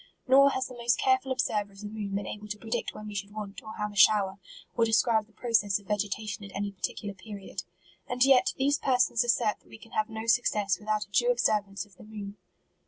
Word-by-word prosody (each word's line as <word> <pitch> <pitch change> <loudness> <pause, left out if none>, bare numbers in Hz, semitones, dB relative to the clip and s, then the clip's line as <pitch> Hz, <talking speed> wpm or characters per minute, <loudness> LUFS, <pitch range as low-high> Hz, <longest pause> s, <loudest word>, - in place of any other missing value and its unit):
Nor 275 +2 +7
has 260 -1 -1
the 255 - -8
most 235 -1 +1
careful 260 0 +2
observer 210 -6 -1
of 195 - -13
the - - -7
moon 205 -2 -4
been 200 - -2
able 210 0 -7
to 210 0 -5
predict 225 +2 -3
when 215 - -8
we 210 - -7
should 205 0 -5
want, 210 -2 -6
or 220 -1 -9
have 210 0 -3
a - - -14
shower, 200 -1 +4 0.4
or 230 - +3
describe 225 -1 +3
the - - -26
progress 215 -4 +1
of 200 - -19
vegetation 210 +1 -2
at 195 - -9
any 200 0 -2
particular 200 +1 -4
period. 195 -2 -8 0.5
And 250 +1 +2
yet, 260 -2 +5
these 280 +2 +2
persons 250 -2 +2
assert 235 -3 +1
that - - -26
we 115 - -11
can - - -16
have 215 +1 0
no 220 0 -5
success 210 -4 +2
without 215 0 -1
a 200 - -33
due 240 +4 +3
observance 210 -4 +1
of 200 -3 -24
the - - -13
moon. 210 -1 -8
215 Hz, 230 wpm, -29 LUFS, 205-235 Hz, 0.5 s, Nor